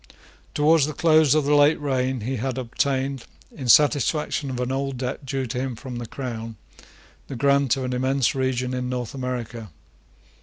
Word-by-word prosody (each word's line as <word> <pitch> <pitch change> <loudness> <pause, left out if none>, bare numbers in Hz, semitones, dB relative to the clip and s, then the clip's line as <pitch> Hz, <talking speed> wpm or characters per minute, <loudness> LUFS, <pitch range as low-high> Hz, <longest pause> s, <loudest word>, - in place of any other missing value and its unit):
Towards 150 0 +4
the 155 - -5
close 155 -3 +4
of 155 -2 +2
the 145 - +2
late 145 +1 +5
reign 130 -3 -1
he 130 +4 -3
had 130 +2 -3
obtained, 130 +1 -2 0.3
in 130 -5 -5
satisfaction 145 +2 +3
of 125 -1 -4
an 125 +1 -2
old 135 0 -2
debt 130 +2 -5
due 135 0 -2
to 125 +1 -4
him 130 -1 -3
from 125 +1 -7
the 120 -1 -6
crown, 115 -3 -6 0.7
the 135 - -6
grant 140 0 +2
of 135 - -3
an 125 0 -2
immense 130 0 +1
region 130 -1 -1
in 125 0 -3
North 125 -3 -4
America. 125 -4 -5
130 Hz, 180 wpm, -24 LUFS, 125-140 Hz, 0.7 s, late